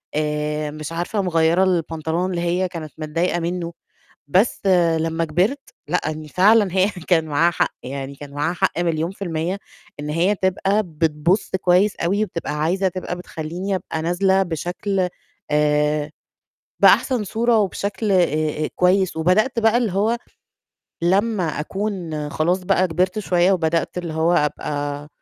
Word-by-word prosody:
آآ، 150 0 -1
مش 155 +1 -7
عارفة 175 +5 -2
مغيّرة 170 0 +2
البنطلون 165 0 0
اللي 175 -2 -2
هي 180 +2 0
كانت 160 -3 -7
متضايقة 165 +3 -1
منه. 170 0 -3 0.5
بس 195 +6 +1 0.3
لمّا 165 +1 -1
كبرت 185 - +1 0.3
لأ، 180 +4 +1
إن 155 0 -7
فعلًا 205 +5 +4
هي 190 +1 +4
كان 175 -3 0
معاها 160 +3 +2
حق، - - 0
يعني 135 +1 -6
كان 140 0 -10
معاها 150 +4 -1
حق 185 -1 0
مليون 165 0 0
في 200 - -8
المِيّة 170 +3 -2 0.4
إن 150 0 -5
هي 175 +6 +2
تبقى 195 +2 +1
بتبُصّ 160 +3 0
كويس 185 +3 +3
أوي، 200 +5 +1
وبتبقى 170 -6 -4
عايزة 190 +4 +1
تبقى 180 0 -4
بتخلّيني 180 +3 -4
أبقى 160 -3 -4
نازلة 190 +3 +2
بشكل 180 +3 -2 0.4
آآ 150 0 +1 0.7
بأحسن 250 -6 +4
صورة 230 +3 +2
وبشكل 200 +1 -1
آآ 155 -3 +1
كويس، 185 -1 +2
وبدأت 215 - +2
بقى 225 +1 +4
اللي 235 -6 +1
هو 215 +5 +1 0.9
لمّا 195 +2 +2 0.2
أكون 175 -5 -3
خلاص 175 +5 +1
بقى 185 0 +2
كبرت 185 +5 0
شوية 180 -2 +2
وبدأت 165 0 0
اللي 170 -3 -4
هو 160 +2 +1
أبقى 145 -1 -2
175 Hz, 145 wpm, -21 LUFS, 155-190 Hz, 0.9 s, فعلًا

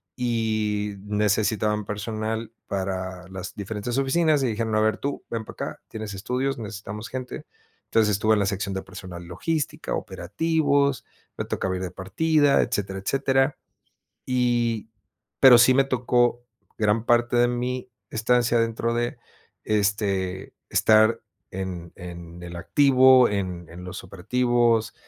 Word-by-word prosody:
y 110 -4 -1
necesitaban 105 0 +1
personal, 110 +2 -3 0.2
para 95 -1 -4
las 95 -1 -7
diferentes 105 +4 -4
oficinas, 150 +2 +2
y 130 - +1
dijeron: 110 -1 -1
"A - - +3
ver, 110 0 +2
tú, 140 0 -4
ven 115 -2 -4
para - - -10 0.2
acá, - - -23
tienes 110 -2 -6
estudios, 125 +7 -2
necesitamos 105 0 -7
gente". 130 -1 -6 0.4
Entonces, 110 -2 +2
estuve 110 +2 +3
en 105 - +2
la 100 - +2
sección 100 -1 -2
de 95 - -3
personal 90 -2 -9
logística, 150 - -3
operativos, 140 - 0 0.3
me - - -3
tocaba 95 0 -2
ir 90 - -4
de 90 - -4
partida, 145 +9 +2
etcétera, 100 -5 -2
etcétera. 135 +5 +1 0.7
Y 120 -3 0 0.5
pero, 130 -2 +9
sí 120 +2 +7
me 135 +1 +4
tocó 120 -2 +1 0.3
gran 110 0 +1
parte 120 0 +3
de 120 0 +4
mi 125 +1 -3 0.2
estancia, 120 +1 +2
dentro 115 0 0
de, 120 0 -1 0.5
este, 100 -3 0 0.2
estar 110 +1 +4 0.3
en 90 -3 -6
en 85 -1 -9
el 85 0 -7
activo, 130 +5 +5
en 90 -4 -3
en 90 +2 -10
los 90 +1 -7
operativos, 115 +4 +1
110 Hz, 135 wpm, -25 LUFS, 100-125 Hz, 0.7 s, pero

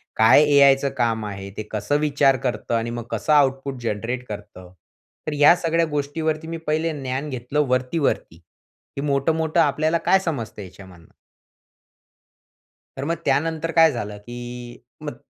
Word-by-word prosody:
काय 110 +7 +6
एआयच 140 -1 +6
काम 115 -3 0
आहे? 100 -1 -7
ते 110 - -3
कसं 110 +7 0
विचार 140 -3 +3
करतं? 120 - -2
आणि 115 +1 -1
मग 120 0 -5
कसं 155 - 0
आउटपुट 135 -2 +2
जनरेट 115 +3 -3
करतं? 100 -3 -9 0.6
तर 155 - -1
या 150 +4 +7
सगळ्या 165 -1 +1
गोष्टीवरती 155 +2 -2
मी 165 0 -4
पहिले 160 +2 0
ज्ञान 135 +3 -3
घेतलं 135 +3 -1
वरती, 130 +5 0
वरती, 85 - -2 0.6
हे - - -2
मोठं-मोठं 160 +4 +1
आपल्याला 155 +2 +1
काय 190 - +6
समजत 145 - -4
याच्यामधनं? 95 -3 -13 1.9
तर 135 - -4
मग 165 +3 0
त्यानंतर 160 +3 0
काय 165 -2 +5
झालं, 105 -4 -5
की 120 +2 -9 0.2
मग 145 -5 -6
135 Hz, 145 wpm, -22 LUFS, 115-155 Hz, 1.9 s, या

